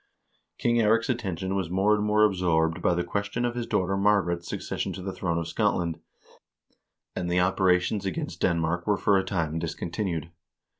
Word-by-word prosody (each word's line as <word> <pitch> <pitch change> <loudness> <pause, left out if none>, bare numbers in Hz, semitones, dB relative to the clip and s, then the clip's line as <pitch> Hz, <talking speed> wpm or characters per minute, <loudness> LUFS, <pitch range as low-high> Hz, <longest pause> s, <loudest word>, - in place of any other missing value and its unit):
King 120 0 +1
Eirik's 115 +1 +3
attention 95 -6 -2
was 95 -4 -1
more 95 +4 +3
and 105 0 +1
more 105 0 +3
absorbed 90 -4 +2
by 90 - +2
the 90 - 0
ques 100 +3 -2
tion 120 +3 -1
of 120 - -1
his 120 -1 -4
daughter 95 +1 0
Margaret's 95 -4 +1
succession 95 - -3
to 95 - -7
the 95 0 -4
throne 85 -3 -2
of 85 -1 -2
Scotland, 85 -4 0 1.2
and 90 -1 -2
the 90 +1 +2
operations 95 +2 +2
against 90 -2 -4
Denmark 85 +1 0
were 105 -1 +3
for 100 0 +3
a - - -1
time 85 -5 -2
discontinued. 85 0 -3
95 Hz, 180 wpm, -27 LUFS, 85-105 Hz, 1.2 s, Eirik's